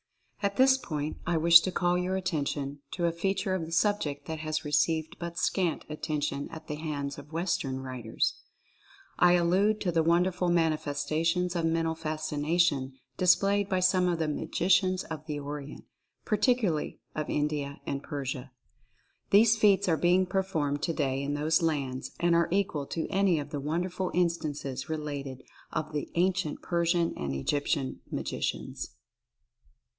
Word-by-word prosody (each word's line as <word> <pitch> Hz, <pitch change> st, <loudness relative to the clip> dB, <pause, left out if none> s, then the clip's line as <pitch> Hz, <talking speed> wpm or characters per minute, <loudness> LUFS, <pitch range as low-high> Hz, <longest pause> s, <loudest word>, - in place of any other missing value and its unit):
At 200 Hz, -1 st, 0 dB
this 265 Hz, 0 st, +6 dB
point 150 Hz, -, -4 dB
I 175 Hz, -1 st, +2 dB
wish 170 Hz, +1 st, +8 dB
to 185 Hz, -, -2 dB
call 175 Hz, 0 st, +1 dB
your 180 Hz, +1 st, 0 dB
attention 145 Hz, -5 st, -2 dB
to 175 Hz, -, -1 dB
a 170 Hz, -, +2 dB
fea 190 Hz, +4 st, -1 dB
ture 190 Hz, -, -1 dB
of 170 Hz, -4 st, -2 dB
the -, -, -9 dB
subject 170 Hz, -5 st, 0 dB
that 160 Hz, -1 st, -5 dB
has 155 Hz, 0 st, -3 dB
received 155 Hz, +2 st, +1 dB
but 170 Hz, 0 st, -5 dB
scant 180 Hz, -5 st, 0 dB
attention 150 Hz, -2 st, -3 dB
at 160 Hz, -1 st, -9 dB
the 150 Hz, -, -5 dB
hands 145 Hz, -3 st, -4 dB
of 145 Hz, +2 st, -13 dB
Western 160 Hz, -6 st, -1 dB
writers. 125 Hz, -4 st, -2 dB, 0.8 s
I 175 Hz, 0 st, +6 dB
allude 185 Hz, +5 st, +3 dB
to 180 Hz, -, 0 dB
the 165 Hz, -1 st, +2 dB
won 170 Hz, +2 st, +4 dB
derful 180 Hz, -1 st, -1 dB
manifestations 165 Hz, +2 st, 0 dB
of 170 Hz, -1 st, 0 dB
Mental 165 Hz, 0 st, +1 dB
Fascination 155 Hz, -2 st, 0 dB, 0.2 s
displayed 200 Hz, +2 st, +3 dB
by 185 Hz, -2 st, +1 dB
some 185 Hz, 0 st, +3 dB
of 175 Hz, -1 st, +1 dB
the 160 Hz, -1 st, -1 dB
Magicians 185 Hz, +4 st, +1 dB
of 155 Hz, -1 st, -7 dB
the 150 Hz, -2 st, -3 dB
Orient, 145 Hz, 0 st, -7 dB, 0.4 s
particularly 215 Hz, -, +1 dB
of 155 Hz, 0 st, -3 dB
India 145 Hz, -1 st, -1 dB
and 140 Hz, -, -3 dB
Persia. 135 Hz, -3 st, -5 dB, 0.8 s
These 220 Hz, +3 st, +6 dB
feats 200 Hz, -2 st, +4 dB
are 165 Hz, -3 st, +3 dB
being 180 Hz, +3 st, +3 dB
performed 165 Hz, -6 st, -1 dB
today 140 Hz, -3 st, 0 dB
in 145 Hz, +1 st, -2 dB
those 155 Hz, +3 st, +2 dB
lands 140 Hz, -5 st, -1 dB
and 175 Hz, 0 st, +3 dB
are 170 Hz, 0 st, +3 dB
equal 175 Hz, -7 st, 0 dB
to 165 Hz, -, -3 dB
any 195 Hz, -3 st, +3 dB
of 145 Hz, 0 st, -5 dB
the 145 Hz, -, -3 dB
won 155 Hz, +5 st, -1 dB
derful 180 Hz, 0 st, -2 dB
instances 155 Hz, -6 st, -1 dB
related 145 Hz, -4 st, -4 dB, 0.3 s
of 155 Hz, 0 st, -3 dB
the 150 Hz, -, -3 dB
ancient 180 Hz, -2 st, 0 dB
Persian 170 Hz, 0 st, +1 dB
or 70 Hz, -, -4 dB
Egyptian 140 Hz, -, -1 dB
Magicians. 60 Hz, 0 st, -4 dB
160 Hz, 160 wpm, -29 LUFS, 145-180 Hz, 0.8 s, wish